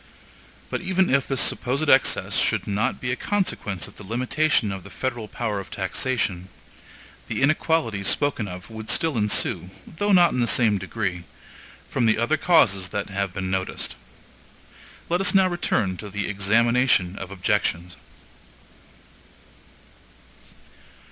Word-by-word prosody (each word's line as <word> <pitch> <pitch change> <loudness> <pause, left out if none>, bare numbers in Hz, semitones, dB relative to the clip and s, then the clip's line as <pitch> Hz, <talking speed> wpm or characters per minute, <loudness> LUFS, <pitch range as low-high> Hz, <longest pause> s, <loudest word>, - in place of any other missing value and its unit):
But - - -2
even 190 0 +1
if 140 0 +2
this 135 -2 -1
supposed 140 +5 +1
excess 135 -1 +3
should - - +1
not 100 +1 -1
be 125 - -3
a - - 0
consequence 130 - -2
of - - -16
the - - -11
limitation 125 +2 0
of 95 -2 -6
the - - -12
federal 120 -4 -4
power 105 -2 -3
of 95 - -9
taxation, 95 -1 -2 0.8
the - - -2
inequalities 135 -9 +1
spoken 140 -7 +1
of 90 +4 -9
would 110 0 -8
still 160 -4 +2
ensue, 105 -4 +1 0.2
though 205 +5 -2
not 175 -3 +6
in - - -2
the 120 - +2
same 110 -5 +3
degree, 95 -3 -4 0.6
from 120 -3 0
the 110 - +3
other 120 +8 +1
causes 110 - +3
that 100 0 -4
have 100 -1 -2
been 95 0 -4
noticed. 95 0 -3 1.1
Let 175 +2 0
us 195 - +2
now 190 -1 +5
return 110 - -1
to 105 - -8
the 100 0 -3
examination 110 -1 +2
of 95 - -7
objections. 90 -2 -1
110 Hz, 140 wpm, -24 LUFS, 95-135 Hz, 1.1 s, not